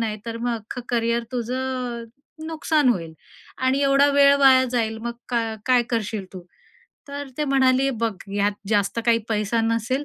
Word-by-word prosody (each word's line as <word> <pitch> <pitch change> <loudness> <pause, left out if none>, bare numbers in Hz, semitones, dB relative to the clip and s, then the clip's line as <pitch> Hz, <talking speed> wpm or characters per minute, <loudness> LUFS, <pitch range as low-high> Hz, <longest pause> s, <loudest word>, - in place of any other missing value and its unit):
नाही, 220 -2 -2
तर 230 0 -4
मग 240 0 -1
अख्खं 225 +3 -7
करिअर 235 0 0
तुझं 250 0 -3
अ, - - -9 0.4
नुकसान 310 -3 +1
होईल 165 -9 -1 0.5
आणि 260 +2 +2
एवढा 275 +1 +4
वेळ 280 0 +6
वाया 260 -2 +6
जाईल; 225 -3 -1
मग 235 +1 -4 0.2
काय 230 -2 -1
काय 250 -2 +4
करशील 215 -3 -2
तू?" 185 -2 -9 0.7
तर 285 0 -6
ते 300 - +1
म्हणाले, 270 -1 +3
"बघ, 230 -3 -1 0.2
यात 205 0 +1 0.2
जास्त 205 +1 +1
काही 230 -1 +4
पैसा 215 +1 0
नसेल 230 +5 -1
240 Hz, 165 wpm, -23 LUFS, 225-265 Hz, 0.7 s, वेळ